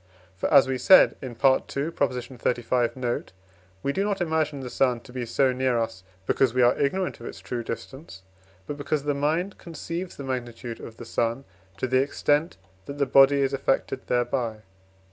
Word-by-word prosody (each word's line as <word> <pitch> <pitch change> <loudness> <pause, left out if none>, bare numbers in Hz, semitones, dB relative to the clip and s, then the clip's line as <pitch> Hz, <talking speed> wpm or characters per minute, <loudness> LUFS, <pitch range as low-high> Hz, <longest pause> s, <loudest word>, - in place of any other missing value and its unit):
For, 95 - -2
as 140 -3 +7
we 130 -1 -2
said 190 +9 +7
in 130 -3 -6
II. - - -14
xxxv. 125 -3 0
note, 120 -5 -3 0.5
we 140 - 0
do 195 - 0
not 205 -1 -1
imagine 160 -4 -1
the 125 - -6
sun 125 -3 +1
to 125 - -15
be 125 -2 -4
so 130 +2 +2
near 130 -1 +1
us, 115 -4 -2 0.2
because 125 +2 +2
we 125 - +4
are 120 - +5
ignorant 180 +7 -1
of 120 - -8
its - - -8
true 120 -1 -4
distance, 115 - -8 0.4
but 145 - -5
because 145 0 -2
the 145 0 0
mind 160 +7 -1
conceives 170 +1 -6
the 140 - -6
magnitude 120 -3 -5
of 115 - -10
the 120 - -9
sun 115 +3 -1 0.3
to 115 - -1
the 130 +1 +3
extent 145 +3 0 0.3
that 140 - -6
the 140 - +2
body 135 +1 +5
is 135 0 +1
affected 135 0 -1
thereby. 120 -3 -1
130 Hz, 185 wpm, -25 LUFS, 120-145 Hz, 0.5 s, as